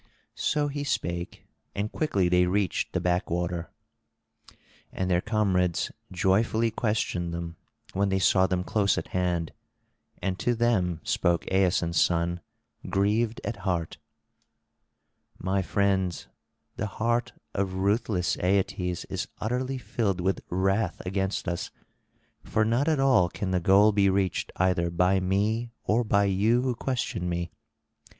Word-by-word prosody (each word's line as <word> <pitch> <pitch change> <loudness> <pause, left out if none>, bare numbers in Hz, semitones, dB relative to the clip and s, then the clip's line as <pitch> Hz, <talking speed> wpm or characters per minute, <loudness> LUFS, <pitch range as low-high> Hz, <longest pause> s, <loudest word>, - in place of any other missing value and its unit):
So 150 -1 0
he 145 0 -3
spake, 85 -10 -3 0.3
and 105 +2 -2
quickly 100 - +1
they 90 0 +3
reached 95 0 0
the - - 0
back 90 0 0
water. 85 0 -2 1.2
And 95 0 -2
their 90 0 +3
comrades 95 -5 +1 0.2
joyfully 110 +5 +2
questioned 105 -6 -1
them, 85 0 -5 0.4
when 100 +1 +1
they 95 - +1
saw 95 +1 +4
them 90 -1 -1
close 100 +1 +1
at - - -4
hand; 90 -3 -1 0.7
and 95 -1 -2
to 120 - +1
them 95 -8 +1
spoke 85 -1 +1
Aeson's 90 -3 +2
son 85 0 +1 0.5
grieved 105 +4 +1
at 120 - -3
heart: 90 -5 -2 1.4
"My 95 +1 0
friends, 95 -2 0 0.5
the 110 - -1
heart 120 +2 0 0.2
of 95 -1 -1
ruthless 100 -1 0
Aeetes 90 -1 0
is - - -3
utterly 125 +4 -2
filled 105 -7 -1
with 95 +2 0
wrath 95 +1 0
against 95 +1 -2
us, 85 -1 -2 0.7
for 110 - +1
not 120 +6 +1
at 155 -3 +2
all 130 -10 +4
can 95 0 -4
the 90 - +2
goal 100 +4 +5
be 100 -1 +3
reached 95 -2 0
either 90 -2 +1
by 90 +3 +2
me 105 +5 0
or 115 +3 +2
by 100 -2 +3
you 105 +5 +2
who 130 -1 0
question 120 -8 -2
me. 85 0 -3
95 Hz, 135 wpm, -27 LUFS, 90-110 Hz, 1.4 s, goal